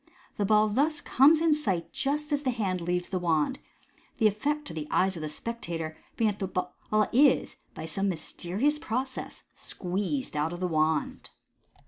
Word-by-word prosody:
The 205 - +1
ball 215 +1 +5
thus 290 +8 +1
comes 300 +5 +5
in 330 -2 +4
sight 190 - -1
just 295 +2 -1
as 290 -1 +1
the 270 - 0
hand 195 -7 -1
leaves 175 +1 -1
the 185 - -1
wand, 165 - +1 0.6
the 225 - +2
effect 290 +9 +1
to 165 - -7
the 155 -2 -5
eyes 190 +1 +2
of 165 - -6
the 155 - -3
spectator 165 -4 -4
s - - -22 0.2
being 220 -2 +3
that 205 - -10
the 195 - -1
ball 180 0 -3 0.4
is, 275 +2 +4 0.2
by - - -6
some 195 +5 -1
mys 165 -4 -5
terious 250 +13 0
process, 260 +4 -4
squeezed 200 - -3
out 150 +3 0
of 175 - -6
the 180 - 0
wand. 155 -2 0
200 Hz, 185 wpm, -28 LUFS, 175-265 Hz, 0.6 s, ball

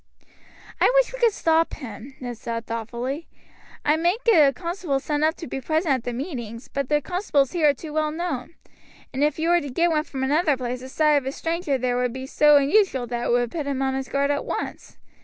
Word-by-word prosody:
"I - - +5
wish - - +3
we - - -6
could 470 -2 +4
stop 330 -4 +1
him," 255 0 -9
Ned 245 -2 -5
said 230 0 -5
thoughtfully. 235 +7 -4 0.6
"I 300 +1 +4
might 350 +8 0
get 330 -12 +6
a - - -1
constable 340 -3 -2
sent 295 +2 -1
up 315 +1 +2
to 330 - -8
be 270 - -5
present 315 +2 +1
at 255 -3 -2
the 245 - -2
meetings, 240 - -6
but 275 -1 -3
the 295 0 +2
constables 300 -6 0
here 320 -4 +3
are - - +4
too 305 +2 -9
well 310 0 +1
known, 320 -2 -4 0.6
and 270 +2 0
if 300 -1 +1
you 325 +1 0
were 345 0 +4
to 285 - -6
get 340 +6 +1
one 305 -1 +1
from 265 -3 -5
another 295 +1 +2
place 250 0 -3
the 260 +1 -9
sight 300 +1 +3
of 270 -2 -2
a - - -1
stranger 325 -2 -1
there 250 -1 0
would 250 -1 0
be 260 0 -6
so 295 +2 +5
unusual 285 - +3
that 240 0 -3
it - - +1
would 240 -1 +1
put 305 -4 -4
him 270 -1 -1
on 265 0 0
his 265 0 -3
guard 280 +1 +1
at 285 - -1
once. - - -5
285 Hz, 235 wpm, -24 LUFS, 255-325 Hz, 0.6 s, get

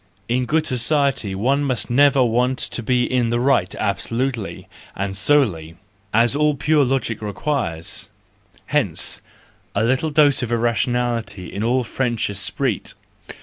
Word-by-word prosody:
In 125 +2 0
good 155 0 +1
society 130 -5 0
one 135 +8 +1
must 130 -4 -2
never 140 +1 +5
want 125 +3 +1
to 120 - -3
be 125 +1 +1
in 125 -1 0
the 120 +1 0
right 125 -8 +1
absolutely 115 +3 -3 0.3
and 100 0 -3
solely, 95 - +1 0.3
as 115 +4 +3
all 150 0 +2
pure 150 +1 +2
logic 125 -4 -1
requires; 105 - -3 0.6
hence, - - 0 0.5
the 100 - +2
little 130 +7 +1
dose 145 -2 +4
of 120 -2 -3
irrationality 115 -4 -1
in 100 - -3
all 125 +2 +1
French 120 -3 -1
esprit 100 +3 -2
120 Hz, 135 wpm, -21 LUFS, 110-135 Hz, 0.6 s, never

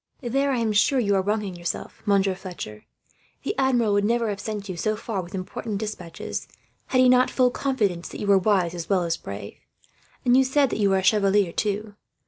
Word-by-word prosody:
"There 275 +4 +1
I 260 - +1
am 230 -2 +1
sure 235 +6 +3
you 205 -4 +1
are 190 - +3
wronging 205 -1 -2
yourself, 175 -1 -5
Monsieur 195 -1 +3
Fletcher. 175 - -8 0.6
The - - -1
Admiral 245 -5 +2
would 205 0 +2
never 230 +1 +1
have 200 -1 -3
sent 210 -2 -5
you 185 - -4
so 215 +5 -1
far, 215 -2 -3
with 180 +2 -9
important 200 +3 -4
despatches, 190 -6 -5 0.4
had 255 - +1
he 255 - +6
not 250 0 +5
full 250 -1 +2
confidence 210 -12 -1
that - - -8
you - - -3
were 200 -1 +5
wise 185 -3 +2
as 170 -2 -6
well 190 -3 +2
as 165 -1 0
brave. 100 -6 -8 0.7
And 245 0 +5
you 265 - +6
said 265 0 +2
you 205 -2 +2
were 195 - +3
a 190 - -1
chevalier, 200 -2 +3
too. 210 +2 -2
205 Hz, 210 wpm, -24 LUFS, 185-235 Hz, 0.7 s, he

